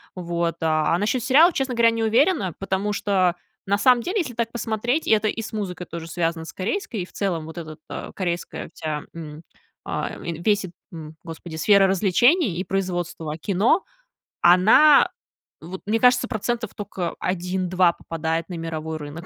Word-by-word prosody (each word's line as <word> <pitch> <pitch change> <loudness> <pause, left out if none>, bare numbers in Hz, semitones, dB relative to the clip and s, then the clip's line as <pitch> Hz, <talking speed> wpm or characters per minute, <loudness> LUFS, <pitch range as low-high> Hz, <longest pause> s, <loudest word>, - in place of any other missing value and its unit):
вот. 170 -2 -2
А 155 +1 +2
а - - +1
насчет 220 +5 0
сериала, 295 +7 +6
честно 265 -3 -1
говоря, 230 0 +5
не 230 0 -2
уверена, 230 - +2
потому 195 +2 -1
что, 185 -4 +1 0.3
на 200 0 +1
самом 245 +3 +4
деле, 375 - -1
если 280 -9 -3
так 230 0 -2
посмотреть, 235 +5 -1
это 215 -1 +3
и 220 - -2
с 220 - -7
музыкой 185 -5 -4
тоже 165 0 -7
связано 165 -1 -2
с - - -9
корейской, 225 - -3
и - - -4
в - - -20
целом, 180 -5 -2
вот 160 +2 -10
этот, 155 -2 -8
а, - - -7
корейская 175 -3 -4
вся, 155 -2 -4
м, 155 -1 -9 0.4
а, - - -3
ин 170 -1 -5
весь 205 +2 +2
этот, 175 - -12 0.2
м, 155 -1 -9
господи, 165 0 -8
сфера 195 +3 +5
развлечений 205 - +3
и 185 - -1
производства 175 -5 -3
кино, 205 - +2 0.6
она 215 - +6 0.5
вот, 180 +4 -8
мне 225 +2 +1
кажется, 250 0 +4
процентов 230 -1 -3
тока 195 -4 -4
1-2 180 0 +1
попадает 165 0 -3
на 180 - -8
мировой 160 -1 -4
рынок. 150 +3 -8
185 Hz, 175 wpm, -23 LUFS, 165-225 Hz, 0.6 s, сериала